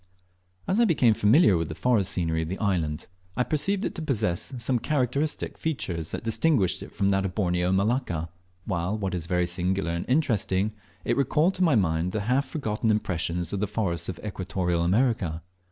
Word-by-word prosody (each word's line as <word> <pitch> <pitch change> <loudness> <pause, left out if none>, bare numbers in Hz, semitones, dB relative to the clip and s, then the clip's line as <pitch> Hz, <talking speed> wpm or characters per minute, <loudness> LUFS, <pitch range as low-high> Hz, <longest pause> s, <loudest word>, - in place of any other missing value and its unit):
As 195 +4 +1
I 235 - +5
became 130 - +4
familiar 105 - +5
with 80 -1 -2
the 80 - -5
forest 115 -4 +2
scenery 80 -2 0
of 80 - -3
the 95 +4 -4
island, 85 -8 -1 0.3
I 125 - +3
perceived 190 - +1
it - - -2
to 170 - -6
possess 110 - -1
some 120 +1 0
characteristic 145 +3 -1
features 95 - -3
that - - -4
distinguished 115 - +2
it - - -9
from 100 -1 0
that 95 0 +2
of 95 -2 -4
Borneo 90 -3 +1
and 95 +1 +2
Malacca, 100 - -1 0.4
while, 95 +1 -1
what 100 -2 -3
is 85 -2 -3
very 90 -1 +1
singular 90 +1 -1
and 85 +1 -3
interesting, 110 -8 +1 0.3
it - - +1
recalled 150 +6 +2
to 185 - 0
my 160 -7 +4
mind 90 -3 +1
the 110 - -1
half 130 +6 +1
forgotten 110 -6 -2
impressions 90 -5 -1
of 100 - -1
the 105 - 0
forests 90 -5 -1
of 90 - -5
Equatorial 90 -3 -2
America. 95 -4 +1
100 Hz, 190 wpm, -26 LUFS, 90-125 Hz, 0.4 s, I